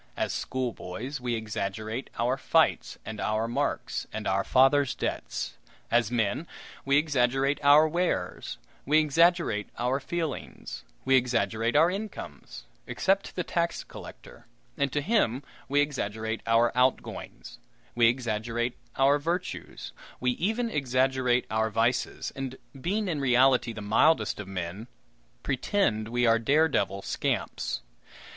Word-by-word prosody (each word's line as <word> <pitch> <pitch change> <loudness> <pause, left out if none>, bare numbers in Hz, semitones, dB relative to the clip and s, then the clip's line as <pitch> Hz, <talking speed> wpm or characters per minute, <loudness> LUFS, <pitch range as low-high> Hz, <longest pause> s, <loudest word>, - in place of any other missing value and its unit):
As - - -1
schoolboys, 125 +1 -4
we 120 -1 -1
exaggerate 110 +2 -4
our 120 +2 +1
fights 135 - +1
and 110 0 -6
our 110 +1 0
marks 140 +5 -2
and 110 -1 -5
our 95 +1 +1
fathers' 135 +3 +4
debts. - - -4 0.3
As 120 -2 +3
men, 120 +6 0 0.4
we 140 0 +3
exaggerate 135 -1 +2
our 145 +2 +7
wares, 175 +3 -2 0.3
we 150 +3 +3
exaggerate 155 - +3
our 125 +3 0
feelings, 160 +2 -5 0.2
we 135 - +3
exaggerate 120 -2 +1
our 165 +4 +5
incomes 205 +3 -7 0.2
except 195 +1 +1
to - - -13
the 180 - -1
tax 170 0 -1
collector, - - -12 0.3
and 140 -2 0
to 145 - 0
him 145 - +1 0.3
we 145 +1 +4
exaggerate 110 -6 -2
our 115 +1 +4
"outgoings"; 125 -1 -1 0.3
we 120 -1 +5
exaggerate 120 0 -1 0.2
our 140 +2 +4
virtues; 165 - -4 0.3
we 125 0 +2
even 220 - -1
exaggerate 130 - +1
our 110 0 +1
vices, 115 +3 0
and, 135 -1 -4 0.3
being 205 +6 -1
in 155 -5 -1
reality 125 -2 +4
the 110 - -7
mildest 110 +10 +3
of 105 - -6
men, 95 +3 -5 0.6
pretend 130 - 0
we 120 +1 +1
are 115 0 +4
dare 150 +8 +4
devil 100 - -1
scamps. - - -2
125 Hz, 130 wpm, -28 LUFS, 115-145 Hz, 0.6 s, our